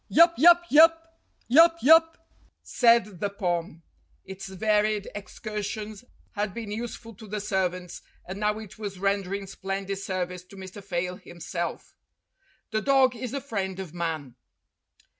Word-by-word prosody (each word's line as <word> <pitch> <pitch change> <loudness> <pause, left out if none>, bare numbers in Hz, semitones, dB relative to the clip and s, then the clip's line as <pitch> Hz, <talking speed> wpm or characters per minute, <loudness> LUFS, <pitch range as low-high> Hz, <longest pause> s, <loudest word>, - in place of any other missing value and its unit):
"Yap 335 +2 +6
yap 345 +4 +6
yap 325 +2 +5 0.3
yap 330 +6 +6
yap!" 325 +3 +6 0.5
said 230 -6 +3
the 205 - -1
Pom. 175 -5 -3 0.4
Its 190 0 -8
varied 210 +1 0
excursions 210 +1 -6 0.3
had 205 -2 -3
been 225 -3 -6
useful 230 +1 -6
to 215 +2 -13
the 210 +1 -4
servants, 185 -3 -2 0.3
and 190 +2 -6
now 210 0 0
it 215 -1 -11
was 200 -3 -5
rendering 195 0 -1
splendid 195 0 -4
service 180 -2 -4
to 185 - -16
Mr. 190 +1 -10
Fayle 180 -1 -3
himself. 175 0 -6 0.8
The 215 0 0
dog 265 -1 +3
is 250 +1 -5
the 275 +3 -4
friend 195 -8 -4
of 180 -4 -7
man. 160 -7 -4
205 Hz, 140 wpm, -26 LUFS, 190-230 Hz, 0.8 s, Yap